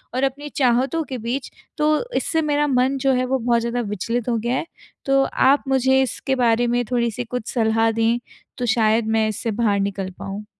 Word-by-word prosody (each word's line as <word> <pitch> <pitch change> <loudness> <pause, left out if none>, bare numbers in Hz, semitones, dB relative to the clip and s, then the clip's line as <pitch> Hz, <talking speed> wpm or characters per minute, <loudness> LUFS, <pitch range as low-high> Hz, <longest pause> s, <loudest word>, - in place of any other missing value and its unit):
और 260 - 0
अपनी 280 +2 -2
चाहतों 265 +5 +2
के 260 - -3
बीच, 240 +4 -4 0.3
तो 305 +6 +2
इससे 320 - 0
मेरा 295 -1 +1
मन 260 +1 +2
जो 270 - +4
है 255 0 +1
वो 265 +1 0
बहुत 235 0 +1
ज़्यादा 235 +1 -2
विचलित 230 +4 -2
हो 235 - +1
गया 235 +3 -1
है। - - -3 0.4
तो 275 0 +3 0.3
आप 285 - +3
मुझे 265 0 +3
इसके 265 +1 -2
बारे 235 +1 +3
में 245 +1 +1
थोड़ी-सी 235 -1 0
कुछ 245 -1 -5
सलाह 225 -1 +2
दें 230 +1 +1 0.4
तो 245 - -2
शायद 220 0 +2
मैं 220 - +2
इससे 220 +2 -3
बाहर 210 -2 +1
निकल 195 -1 -2
पाऊँ? 200 +2 -6
245 Hz, 200 wpm, -21 LUFS, 225-265 Hz, 0.4 s, जो